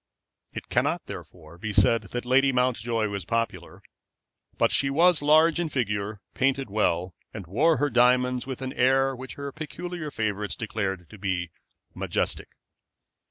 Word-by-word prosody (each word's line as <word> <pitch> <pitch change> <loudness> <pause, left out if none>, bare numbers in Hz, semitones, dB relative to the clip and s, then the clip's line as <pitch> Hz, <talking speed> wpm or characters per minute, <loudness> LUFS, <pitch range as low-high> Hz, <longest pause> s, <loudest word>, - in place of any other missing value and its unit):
It - - -7
cannot, - - 0
therefore, 85 -1 -10
be 110 +2 -3
said 100 +3 +4
that 120 +4 -6
Lady 135 +2 +4
Mountjoy 120 -3 0
was 100 -2 -4
popular; 115 +5 -3 0.7
but - - +3
she 135 - +2
was 165 +3 +4
large 155 +3 +5
in 170 -2 -1
figure, 105 -7 -1
and 105 - -17
painted 135 -3 0
well, 90 -4 0 0.2
and 100 -4 -6
wore 145 - +2
her 145 +2 0
diamonds 125 +1 +3
with 135 0 -5
an 130 - -4
air 135 +1 +3
which 130 +1 -8
her 140 0 -5
peculiar 160 +2 -6
favorites 105 -5 -2
declared 100 -6 -3
to 110 - -12
be 90 -3 -2 0.4
majestic. - - -2
125 Hz, 155 wpm, -26 LUFS, 105-135 Hz, 0.7 s, large